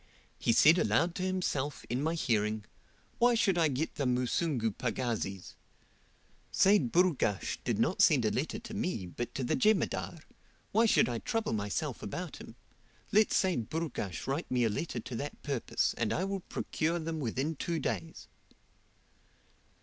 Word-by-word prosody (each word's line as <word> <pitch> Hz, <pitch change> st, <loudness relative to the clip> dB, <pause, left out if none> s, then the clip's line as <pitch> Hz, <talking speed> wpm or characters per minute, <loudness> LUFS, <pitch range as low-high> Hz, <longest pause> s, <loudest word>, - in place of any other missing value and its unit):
He -, -, +2 dB
said 160 Hz, +9 st, +6 dB
aloud 170 Hz, +1 st, +2 dB
to 180 Hz, -, -5 dB
himself, 180 Hz, -7 st, -2 dB
in 125 Hz, +3 st, -1 dB
my 160 Hz, +3 st, 0 dB
hearing, 110 Hz, -7 st, 0 dB, 0.5 s
'Why 240 Hz, 0 st, +5 dB
should 200 Hz, -5 st, +3 dB
I 165 Hz, -2 st, +3 dB
get 145 Hz, +3 st, -2 dB
the 140 Hz, -, 0 dB
Musungu 125 Hz, 0 st, 0 dB
pagazis? 110 Hz, -5 st, -3 dB, 1.0 s
Seyd 190 Hz, -, +4 dB
Burghash 165 Hz, -, +1 dB
did -, -, 0 dB
not -, -, +1 dB
send -, -, +5 dB
a -, -, +2 dB
letter -, -, -2 dB
to -, -, -9 dB
me, 95 Hz, -, -2 dB
but 115 Hz, +7 st, -6 dB
to 135 Hz, -, -2 dB
the 120 Hz, -, +1 dB
Jemadar. 215 Hz, -6 st, +1 dB, 0.5 s
Why 225 Hz, +2 st, +4 dB
should -, -, +4 dB
I 120 Hz, -2 st, -2 dB
trouble 225 Hz, -, -1 dB
myself 100 Hz, -2 st, -2 dB
about -, -, -5 dB
him? -, -, -11 dB, 0.6 s
Let 215 Hz, +1 st, +5 dB
Seyd 180 Hz, -, +1 dB
Burghash 155 Hz, -, -3 dB
write 140 Hz, +5 st, -2 dB
me 125 Hz, -1 st, +2 dB
a 115 Hz, -, +3 dB
letter 120 Hz, +4 st, -3 dB
to 120 Hz, +2 st, -7 dB
that 145 Hz, +3 st, -6 dB
purpose, 140 Hz, -5 st, 0 dB
and -, -, +1 dB
I 180 Hz, -, 0 dB
will 195 Hz, 0 st, -2 dB
procure 165 Hz, -2 st, -2 dB
them 160 Hz, -1 st, -3 dB
within 135 Hz, +4 st, -2 dB
two 170 Hz, +4 st, -2 dB
days."' 95 Hz, -, -4 dB
145 Hz, 160 wpm, -31 LUFS, 115-175 Hz, 1.0 s, said